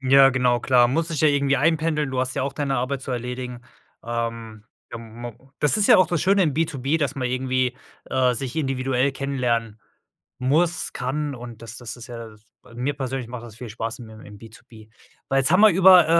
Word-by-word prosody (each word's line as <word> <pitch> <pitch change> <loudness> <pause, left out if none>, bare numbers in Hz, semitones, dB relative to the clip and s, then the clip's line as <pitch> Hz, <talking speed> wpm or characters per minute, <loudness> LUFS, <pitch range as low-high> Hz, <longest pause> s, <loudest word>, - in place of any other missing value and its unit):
Ja, 135 0 +6
genau, 125 -2 +1
klar, 125 -2 +4
muss 160 +6 0
sich 155 -4 -2
ja 155 - +6
irgendwie 140 -1 +2
einpendeln. 155 -1 +1
Du 130 -1 -1
hast 130 0 -2
ja - - -1
auch 140 - -2
deine 140 -3 -1
Arbeit 130 +2 -2
zu 130 - -7
erledigen. 125 0 -5 0.4
Ähm, 115 -2 -4 0.3
ja, 120 - -5
ma 115 +1 -9 0.3
das 150 +7 +2
ist 210 - +3
ja - - +8
auch 185 -2 +5
das 175 -2 -1
Schöne 195 +2 +4
im 155 - +1
B2B, 150 -1 0
dass 140 -3 -1
man 130 -2 -2
irgendwie, 130 0 0 0.3
äh, 130 -1 +1
sich 125 +1 -4
individuell 135 -2 0
kennenlernen 120 -6 -2 0.6
muss, 160 +7 +1
kann 145 +3 -3
und 120 -2 -10
das 115 +1 -9
das 120 -1 -8
ist 120 -2 -10
ja 120 - -7 0.5
da 115 - -17
mir 130 +4 -2
persönlich 130 -3 -4
macht 120 -1 -7
das 115 -2 -12
viel 120 -2 -8
Spaß 115 +2 -5
im 115 - -10
im 105 0 -12
B2B. 110 0 -15 0.4
Weil, 135 - +2
jetzt 135 - +3
haben 185 +3 +5
wir 215 - +8
über, 185 -1 +7
130 Hz, 205 wpm, -23 LUFS, 120-145 Hz, 0.6 s, ja